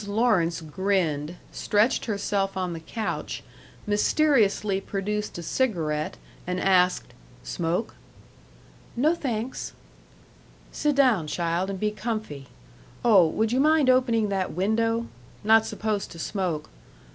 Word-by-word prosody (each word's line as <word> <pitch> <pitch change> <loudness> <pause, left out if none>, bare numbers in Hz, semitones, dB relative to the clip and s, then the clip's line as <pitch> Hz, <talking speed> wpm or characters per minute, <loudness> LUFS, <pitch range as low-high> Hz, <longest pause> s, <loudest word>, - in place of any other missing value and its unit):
Lawrence 200 -7 +2
grinned, 165 -2 -1 0.2
stretched 215 +4 +1
herself 200 -2 -1
on 180 -2 -2
the 165 - -5
couch, 215 +7 -4 0.4
mysteriously 210 -3 +2
produced 210 +1 -3
a 170 - -6
cigarette, 160 -9 -1 0.3
and 180 0 -1
asked, 180 -9 +2 0.3
"Smoke?" 175 +6 -2 1.0
"No, 295 +7 +3
thanks." 250 -6 -4 1.0
"Sit 295 -1 0
down, 245 - +3
child, 170 +3 -1
and 195 -1 -4
be 210 +1 0
comfy. 215 - -5 0.6
Oh, 195 -8 +7
would 220 +7 0
you 255 - +2
mind 300 -2 +5
opening 235 -4 +2
that 190 -2 -1
window? 225 +6 +1 0.4
Not 220 +1 +5
supposed 215 -2 -2
to - - -11
smoke.... 170 -3 -3
205 Hz, 115 wpm, -26 LUFS, 180-230 Hz, 1.0 s, Oh